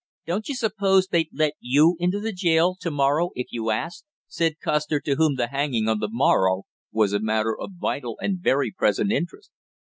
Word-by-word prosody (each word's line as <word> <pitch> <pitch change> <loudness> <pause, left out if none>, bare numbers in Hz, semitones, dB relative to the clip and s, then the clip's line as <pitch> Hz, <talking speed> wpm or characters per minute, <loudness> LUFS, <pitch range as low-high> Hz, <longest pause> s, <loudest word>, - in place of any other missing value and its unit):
"Don't 195 - -3
you 280 - -2
suppose 195 -5 +2
they'd 165 -3 +1
let 155 -1 +1
you 150 +8 +4
into 180 +3 0
the 220 +1 -3
jail 170 -2 +3
yard 185 - -9
to 180 -2 -3
morrow 145 +3 +1
if 125 - -3
you 115 -1 -3
asked?" 110 +11 -3 0.2
said 165 -2 -1
Custer, 150 -1 0
to 140 0 -1
whom 155 0 +2
the 120 -2 -1
hanging 135 -5 -1
on 110 -1 +1
the 105 - -2
morrow 95 -6 +2 0.3
was 105 -2 +1
a 100 - +2
matter 110 +1 0
of 195 - -8
vital 120 -9 -3
and 190 -2 -2
very 140 -5 +1
present 200 +2 +1
interest. 230 - -3
150 Hz, 200 wpm, -24 LUFS, 120-180 Hz, 0.3 s, you